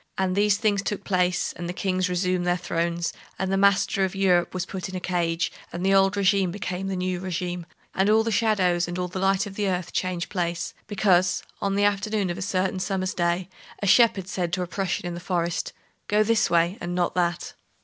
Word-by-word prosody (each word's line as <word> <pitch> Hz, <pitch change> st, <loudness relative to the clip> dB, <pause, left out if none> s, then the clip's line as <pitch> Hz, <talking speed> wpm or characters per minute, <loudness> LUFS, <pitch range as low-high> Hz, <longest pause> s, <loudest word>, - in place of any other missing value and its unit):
And 185 Hz, -1 st, 0 dB
these 205 Hz, 0 st, +3 dB
things 205 Hz, -2 st, +1 dB
took 200 Hz, 0 st, -3 dB
place, 180 Hz, -2 st, +1 dB
and 175 Hz, 0 st, -5 dB
the -, -, -3 dB
kings 185 Hz, 0 st, 0 dB
resumed 180 Hz, 0 st, 0 dB
their 175 Hz, 0 st, +2 dB
thrones, 170 Hz, -1 st, -2 dB, 0.2 s
and 190 Hz, 0 st, -2 dB
the -, -, +2 dB
master 195 Hz, 0 st, +3 dB
of 190 Hz, 0 st, -1 dB
Europe 180 Hz, -3 st, +3 dB
was 185 Hz, -1 st, -3 dB
put 190 Hz, -1 st, -5 dB
in 185 Hz, -, -7 dB
a -, -, -2 dB
cage, 170 Hz, -2 st, -1 dB, 0.2 s
and 175 Hz, +2 st, -4 dB
the 195 Hz, -, +4 dB
old 195 Hz, +1 st, +4 dB
regime 195 Hz, -1 st, +3 dB
became 185 Hz, 0 st, -4 dB
the 195 Hz, -, -2 dB
new 180 Hz, 0 st, -2 dB
regime, 180 Hz, -1 st, -4 dB, 0.3 s
and 190 Hz, +2 st, +2 dB
all 220 Hz, +1 st, +5 dB
the 225 Hz, -, -1 dB
shadows 190 Hz, -6 st, +2 dB
and 175 Hz, 0 st, -4 dB
all 180 Hz, 0 st, -1 dB
the 185 Hz, +1 st, -5 dB
light 195 Hz, +1 st, +2 dB
of 200 Hz, -, -8 dB
the 200 Hz, 0 st, -1 dB
earth 180 Hz, -1 st, -3 dB
changed 180 Hz, -2 st, -2 dB
place, 170 Hz, -3 st, -2 dB
because, 185 Hz, -3 st, +2 dB, 0.2 s
on 195 Hz, 0 st, 0 dB
the 200 Hz, -, +2 dB
afternoon 205 Hz, -1 st, +1 dB
of 175 Hz, -, -5 dB
a -, -, -5 dB
certain 185 Hz, 0 st, -1 dB
summer's 185 Hz, 0 st, -1 dB
day, 175 Hz, 0 st, 0 dB, 0.4 s
a -, -, +1 dB
shepherd 200 Hz, -2 st, +4 dB
said 180 Hz, -3 st, -2 dB
to 180 Hz, 0 st, 0 dB
a -, -, -5 dB
Prussian 180 Hz, -1 st, -2 dB
in 175 Hz, -, -3 dB
the 170 Hz, -, -5 dB
forest, 175 Hz, -1 st, -2 dB, 0.4 s
"Go 210 Hz, +1 st, +3 dB
this 225 Hz, +1 st, +2 dB
way, 170 Hz, +3 st, +2 dB
and 175 Hz, 0 st, -3 dB
not 175 Hz, -1 st, 0 dB
that!" 175 Hz, -2 st, -1 dB
185 Hz, 220 wpm, -25 LUFS, 175-195 Hz, 0.4 s, all